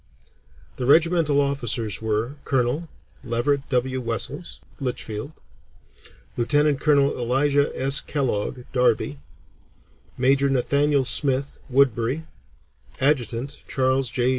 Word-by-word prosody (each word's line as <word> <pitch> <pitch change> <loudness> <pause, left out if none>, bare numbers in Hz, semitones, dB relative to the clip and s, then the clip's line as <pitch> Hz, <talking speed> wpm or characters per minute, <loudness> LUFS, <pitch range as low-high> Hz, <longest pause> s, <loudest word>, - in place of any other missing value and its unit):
The 125 - -3
regimental 160 -1 +4
officers 120 -7 -1
were: 110 +3 -1
Colonel, 135 +5 -1 0.3
Leverett 135 +3 -1
W. 130 0 0
Wessells, 115 - -4 0.2
Litchfield; 125 -1 -4 1.0
lieutenant 145 +4 +2
colonel, 140 -2 +3
Elisha 140 +4 +1
S. 135 +1 +3
Kellogg, 130 -3 -2
Derby; 120 - +1 1.0
major, 135 +2 +3
Nathaniel 140 +1 +2
Smith, 135 +2 0
Woodbury; 130 +2 +1 0.7
adjutant, 135 -1 0
Charles 130 -1 +1
J. 125 +1 0
130 Hz, 90 wpm, -23 LUFS, 120-140 Hz, 1.0 s, regimental